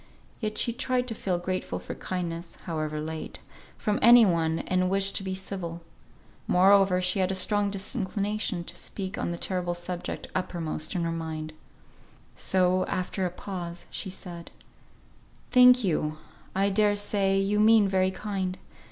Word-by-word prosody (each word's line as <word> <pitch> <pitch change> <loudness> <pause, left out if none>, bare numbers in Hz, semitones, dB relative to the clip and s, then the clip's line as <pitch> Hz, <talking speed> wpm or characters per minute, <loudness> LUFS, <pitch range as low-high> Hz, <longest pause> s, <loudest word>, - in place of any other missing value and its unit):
Yet 215 -2 -3
she 235 - +2
tried 250 +1 -1
to - - -2
feel 190 -4 -1
grateful 185 +1 -3
for - - -7
kindness 170 -2 -5
(however 155 -3 -3
late) 160 +1 -5 0.4
from 210 -1 0
any 235 0 +8
one, 165 -3 +1
and 185 0 +1
wished 195 0 +2
to - - -2
be 190 -1 -3
civil. 175 -3 -5 0.6
Moreover, 190 0 +5
she 185 +2 +1
had 185 0 +2
a - - -1
strong 205 +2 +2
disinclination 200 -2 -2
to - - -7
speak 195 0 -4
on - - -1
the 170 - -3
terrible 175 -1 -1
subject 175 0 -4
uppermost 170 -2 -3
in 175 - 0
her 165 - -1
mind. 160 -1 -5 0.8
So, 185 0 +2
after 185 +1 -1
a - - -3
pause 175 -1 -7
she 195 - -4
said, 175 -2 -8 1.0
"Thank 250 0 +7
you. 155 -4 0 0.4
I 195 +1 +2
dare 205 +1 +3
say 200 -1 +1
you 200 +2 +1
mean 215 -1 +6
very 190 -1 +2
kind. 190 -2 -3
185 Hz, 155 wpm, -27 LUFS, 175-200 Hz, 1.0 s, any